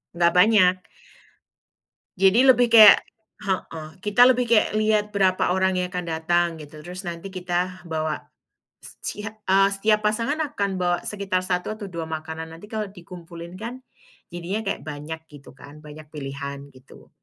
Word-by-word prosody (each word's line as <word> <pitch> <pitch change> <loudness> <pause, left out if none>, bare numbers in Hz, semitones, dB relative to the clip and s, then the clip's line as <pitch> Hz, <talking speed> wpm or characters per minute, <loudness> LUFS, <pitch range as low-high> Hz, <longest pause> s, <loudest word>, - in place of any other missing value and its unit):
Nggak 170 0 +3
banyak. 185 -1 +5 1.4
Jadi 195 +6 +5
lebih 245 -1 +6
kayak 215 -3 +10 0.5
heeh, 165 -5 -3
kita 210 +4 +5
lebih 250 -2 +3
kayak 225 -2 +3
lihat 215 -1 +2
berapa 185 -2 +2
orang 190 0 +1
yang 180 +1 -3
akan 180 -1 -3
datang 170 +2 +1
gitu, 150 0 -11
terus 180 +4 -8
nanti 170 +2 -6
kita 185 0 -3
bawa, 155 -1 -3 0.5
secia 210 +1 -7 0.2
eee, 195 +1 +5
setiap 210 +1 +1
pasangan 230 +8 0 0.2
akan 200 -4 -2
bawa 175 -1 0
sekitar 195 -3 -2
1 185 +3 -2
atau 210 -2 -8
2 170 -2 -5
makanan, 160 0 -6
nanti 190 +6 -13
kalau 215 -1 -3
dikumpulin 175 -1 -11
kan, 235 +4 -7 0.5
jadinya 175 +4 -4
kayak 200 -6 -4
banyak 150 +2 -6
gitu 145 -3 -15
kan, 150 +2 -13
banyak 150 0 -12
pilihan 140 0 -7
gitu. 130 -1 -18
180 Hz, 150 wpm, -23 LUFS, 160-210 Hz, 1.4 s, kayak